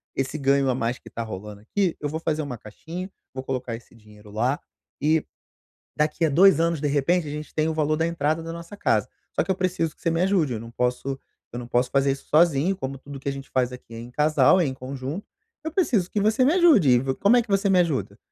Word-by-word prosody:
esse 135 +3 -2
ganho 140 -1 +2
a 125 - +1
mais 120 0 -2
que - - -14
tá 115 - -4
rolando 105 -1 -8
aqui, 180 - 0
eu 150 - -2
vou 160 +2 -3
fazer 160 -1 -1
uma 140 -4 -5
caixinha, 165 - -8 0.2
vou 130 0 -5
colocar 125 -3 -3
esse 120 +1 -14
dinheiro 105 -1 -17
lá, 125 +7 0 0.4
e 155 +2 +2 0.7
daqui 150 +2 0
a - - +2
2 170 +2 +6
anos, 165 -1 +1
de 145 - +1
repente, 150 +4 +1
a 145 - -4
gente 150 0 -6
tem 155 0 +1
o - - -1
valor 155 -1 +1
da 160 +1 0
entrada 160 -1 0
da 165 - -6
nossa 170 +5 -9
casa. - - +1 0.3
Só - - +2
que - - -14
eu - - +1
preciso 185 -4 -1
que - - -28
você 165 - +2
me 165 +1 0
ajude, 180 -8 +2
eu 110 - -3
não 115 +1 -9
posso 125 +3 -1 0.3
eu 120 - -4
não 120 - -7
posso 125 +1 +1
fazer 140 0 +2
isso 135 - -6
sozinho, 165 +3 +3
como 135 -5 -5
tudo 140 +1 -9
que 140 - -3
a - - 0
gente 135 0 -8
faz 125 -1 +1
aqui 125 -2 -11
é - - -7
em 120 +1 -9
casal, 150 +4 +4
é 175 - +3
em 135 - -2
conjunto, 135 +7 -6 0.4
eu 320 - -3
preciso 250 - +1
que 210 - 0
você 215 +5 +3
me 275 - +4
ajude, 320 - +5
e 125 -1 +6
v 130 +1 -2
como 205 - +4
é - - +5
que 235 - -10
você 200 0 +2
me 185 -1 +5
ajuda? 165 -7 0
150 Hz, 260 wpm, -24 LUFS, 130-170 Hz, 0.7 s, 2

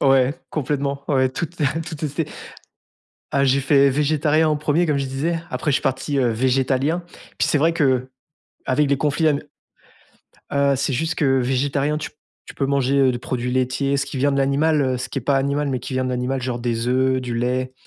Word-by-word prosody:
Ouais, 135 +1 +4 0.2
complètement, 140 -1 -2
ouais, 130 -2 +3
tout 160 +6 -3
te 170 -2 -7 0.2
tout 160 - -5
testé! 150 +1 -3 1.0
Ah, 140 0 +2
j'ai 135 +1 +3
fait 140 0 +4
végétarien 150 +2 +2
en 155 - +1
1er, 155 +3 +1
comme 150 -2 +1
je 135 - -2
disais, 150 +6 -1
après 150 - -1
je - - +2
suis - - 0
parti, 135 +2 -1
heu, 125 -3 +2
végétalien. 130 +7 +1 0.4
Puis, - - +2
c'est 150 - +2
vrai 165 +3 +3
que 130 -5 +1 0.6
avec 145 +3 +2
des 140 0 +2
conflits 150 +3 +1
à 150 - +4
ne 140 - -2 1.1
heu, 140 0 +3
c'est 135 +1 -1
juste 160 +6 -1
que 135 -3 +2
végétarien 140 +4 0
tu 155 - -6
p - - -37 0.3
tu - - -9
peux 135 - -1
manger, 140 0 +1
heu, 135 -1 +4
du 120 - -3
produit 125 -1 -3
laitier, 130 +2 0
ce 140 - 0
qui 135 -1 -6
vient 140 +2 +2
de 140 - 0
l'animal, 140 +2 +2
heu, 130 -1 0
ce - - -4
qui 135 - -3
est - - -7
pas 140 +2 +2
animal, 140 +1 0
mais 130 - -1
qui 130 - -6
vient 130 0 0
de 130 - -2
l'animal, 125 +1 -2
genre 125 -1 -2
des 120 0 -2
œufs, 130 +1 +2
du 120 -2 -4
lait 125 +2 -1
140 Hz, 220 wpm, -21 LUFS, 130-145 Hz, 1.1 s, Ouais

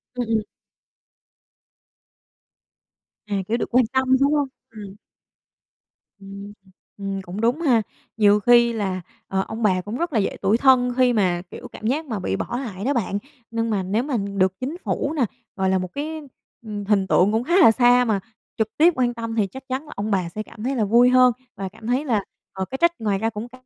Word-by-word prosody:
Ừm, 245 -2 -2
ừm. 225 -1 +1 2.9
À, 205 - -2
kiểu, 230 +2 0
được - - -3
quan 250 -1 +4
tâm, 265 0 +3 0.2
đúng 285 +2 +3
hông? 290 -2 +1 0.2
Ừm. 205 -3 -10 1.2
Ừm, 200 +1 -9 0.5
ừm. 195 -1 -4
Cũng 185 +4 -7
đúng 245 +8 +1
ha. 245 -8 +3 0.4
Nhiều 205 -1 +5
khi 235 +1 +5
là, 190 -4 -2 0.3
ờ, 190 0 0
ông 220 +1 -5
bà 185 -3 +3
cũng 210 +6 -5
rất 340 -3 -2
là 225 - +3
dễ 195 - -1
tủi 210 +4 +3
thân 250 -2 +4
khi 250 -1 +4
mà, 180 -5 +1
kiểu, - - -9
cảm 220 - -6
giác 305 +6 0
mà 220 -7 -4
bị 95 - -2
bỏ 240 - -3
lại 210 -5 -6
đó 285 - +2
bạn. 200 -4 -1 0.3
Nhưng 230 0 -1
mà 200 -3 0
nếu 210 +6 0
mà 275 -4 -1
được 200 -2 0
chính 275 +7 -4
phủ 285 - -1
nè, 270 -6 +2 0.3
gọi 190 -1 0
là, 190 - +2
một 185 -1 -5
cái, 310 +2 -4 0.4
ừm, 205 -2 -5
hình 195 -2 +2
tượng 195 +3 +4
cũng 225 +2 0
khá 345 +6 +2
là 320 -12 +8
xa 245 +1 +4
mà 210 -3 +1 0.4
trực 220 -1 +1
tiếp 335 +3 +5
quan 245 -1 +1
tâm 230 -1 -5
thì 210 -3 +1
chắc 265 +8 -10
chắn 265 +4 -3
là - - -12
ông 205 +1 -3
bà 180 -3 0
sẽ 215 +4 -5
cảm 215 0 -12
thấy 265 +3 -1
là 225 - +1
vui 240 +4 +5
hơn, 255 -1 +5 0.2
và 195 -1 -4
cảm 220 +3 -12
thấy 260 +5 0
là, 215 -7 +1 0.3
ờ, 190 -1 -3
cái 265 - -6
trách 340 +4 +4
ngoài 205 -3 0
ra 225 +1 0
cũng 220 +2 -6
c - - -25
225 Hz, 215 wpm, -22 LUFS, 200-250 Hz, 2.9 s, là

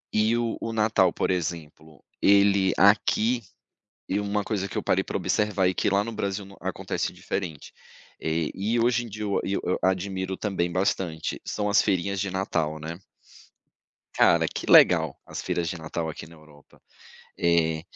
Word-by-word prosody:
E 110 +2 +3
o 115 -1 -1
o 115 - -3
Natal, 105 -5 +3
por - - -1
exemplo, 80 -4 -5 0.2
ele 100 -1 +4
aqui 110 +4 +3 0.7
e 100 +2 0
uma 105 0 -1
coisa 100 -3 -2
que - - -4
eu - - -2
parei - - +2
para - - -4
observar 105 -3 +1
e 90 - -1
que - - 0
lá 100 +1 +2
no 115 - -5
Brasil 100 -1 -3
não 100 0 -14
acontece - - -3
diferente. 85 -7 -5 0.5
Eh 80 0 -1
e 110 +5 -1
hoje 120 +1 +2
em 115 - -8
dia 105 +1 -7
eu 100 - 0
e 100 - -1
eu 90 - -1
a 95 - +4
admiro 95 0 -3
também 90 -4 -1
bastante, 90 -3 -2
são 105 -1 -2
as 100 - +4
feirinhas 100 0 0
de 100 -2 -2
Natal, 80 -5 -1
né. 80 +2 -7 1.2
Cara, - - +4
que - - -5
legal 80 -5 +5
as - - -6
feiras 85 -1 -2
de 90 - -3
Natal 80 +1 -4
aqui - - -8
na 85 +1 -15
Europa, 75 -2 -20 0.6
eh 80 -2 +1
95 Hz, 175 wpm, -26 LUFS, 85-105 Hz, 1.2 s, legal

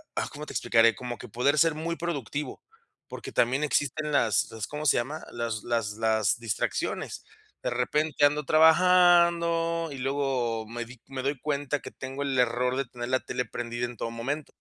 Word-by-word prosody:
ah, - - -1
¿cómo 150 +1 -7
te - - -9
explicaré? 115 -1 +4
Como 120 +1 -6
que - - -10
poder 125 +7 +1
ser 165 +1 +4
muy 165 +2 -3
productivo, 150 -4 -4 0.5
porque - - -7
también 130 +5 +2
existen 150 +1 0
las 115 -6 +2
las, 110 -1 -4
¿cómo 150 +1 -5
se 140 - +4
llama? 140 +7 -3
Las 115 -3 -3
las 115 -3 -1
las 110 -1 +1
distracciones. 115 -4 -3 0.4
De - - 0
repente, 145 +5 +1
ando 150 0 +1
trabajando 170 0 +4
y 140 - -6
luego 130 -4 -1
me 120 +1 -5
di 120 0 -14
me 135 -1 -5
doy 140 +2 -1
cuenta 145 0 -1
que - - -9
tengo 135 +1 -5
el 135 -2 -1
error 125 +1 +1
de 135 - 0
tener 120 0 -7
la 130 0 +2
tele 125 - -2
prendida 120 0 -4
en 120 -1 -8
todo 115 - -3
momento. 135 +6 -4
135 Hz, 185 wpm, -27 LUFS, 120-150 Hz, 0.5 s, explicaré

